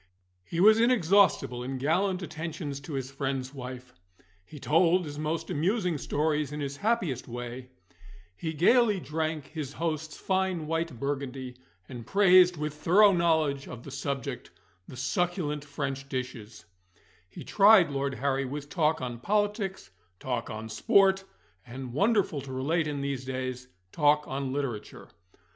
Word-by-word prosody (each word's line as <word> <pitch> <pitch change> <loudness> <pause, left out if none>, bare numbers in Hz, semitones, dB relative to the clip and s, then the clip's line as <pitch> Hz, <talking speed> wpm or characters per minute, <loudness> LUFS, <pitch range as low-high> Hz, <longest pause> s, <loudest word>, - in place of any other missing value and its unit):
He 165 - -5
was 215 +4 +7
inexhaustible 200 - +3
in 130 +2 -4
gallant 180 +7 0
attentions 155 -3 -5
to 140 +2 -9
his 135 -1 -4
friend's 135 -1 -3
wife; 125 -1 -8 0.5
he 150 +9 -12
told 170 +5 +3
his 145 -1 -7
most 155 +4 -3
amusing 180 0 0
stories 150 +2 -1
in 150 - -5
his 140 -1 -4
happiest 205 - -1
way; 120 +1 -7 0.7
he 160 - -4
gaily 210 - +4
drank 155 -1 -3
his 150 -4 -6
host's 155 -1 -3
fine 190 -4 -1
white 165 -5 -2
Burgundy, 135 -2 -4 0.3
and 120 -2 -8
praised 185 -2 +5
with 150 0 -3
thorough 195 +7 +5
knowledge 160 -6 +1
of 120 -1 -9
the 140 - -9
subject 135 -1 -4 0.4
the 130 - -10
succulent 150 +2 -1
French 140 -2 -5
dishes; 125 -5 -6 0.6
he - - -10
tried 200 -5 +6
Lord 140 -1 -2
Harry 135 0 0
with 145 +2 -6
talk 155 -2 +1
on 120 -2 -5
politics, 205 - -1 0.3
talk 125 -3 -3
on 110 0 -6
sport, 190 - +3 0.4
and 125 0 -8
(wonderful 200 - +1
to 135 0 -9
relate 155 +5 0
in 145 -2 -3
these 140 -2 -3
days) 130 -1 -4 0.2
talk 150 -1 +3
on 135 0 -3
literature. 135 -6 -5
150 Hz, 145 wpm, -28 LUFS, 130-175 Hz, 0.7 s, was